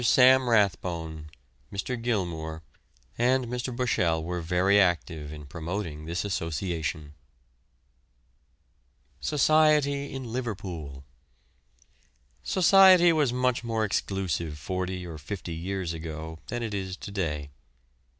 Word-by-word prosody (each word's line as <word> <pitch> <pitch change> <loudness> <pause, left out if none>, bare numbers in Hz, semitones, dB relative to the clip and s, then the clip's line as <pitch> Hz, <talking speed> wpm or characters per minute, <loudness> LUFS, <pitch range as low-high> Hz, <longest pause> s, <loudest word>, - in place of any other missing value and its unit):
Sam 130 +1 +6
Rathbone, 85 -7 0 0.4
Mr. 100 +6 -3
Gilmour, 85 -9 -3 0.6
and 125 +1 +3
Mr. 125 +2 -3
Bushell 85 -10 +1
were 90 +1 -3
very 90 +4 +3
active 80 -5 0
in 75 -1 -9
promoting 80 +1 -5
this 85 +4 -3
association. 80 -3 -3 2.1
SOCIETY 150 -1 +3
IN 135 -1 -5
LIVERPOOL. 95 - -5 1.4
Society 185 -1 +6
was 150 -6 +2
much 125 -1 0
more 115 -2 0
exclusive 90 -6 -2
forty 90 +3 -3
or 80 -3 -8
fifty 85 +2 -6
years 90 +1 -3
ago 80 0 -7
than 120 -1 -3
it 110 -2 -4
is 95 -1 -4
to - - -8
day. 75 -7 -3
95 Hz, 105 wpm, -27 LUFS, 80-120 Hz, 2.1 s, Sam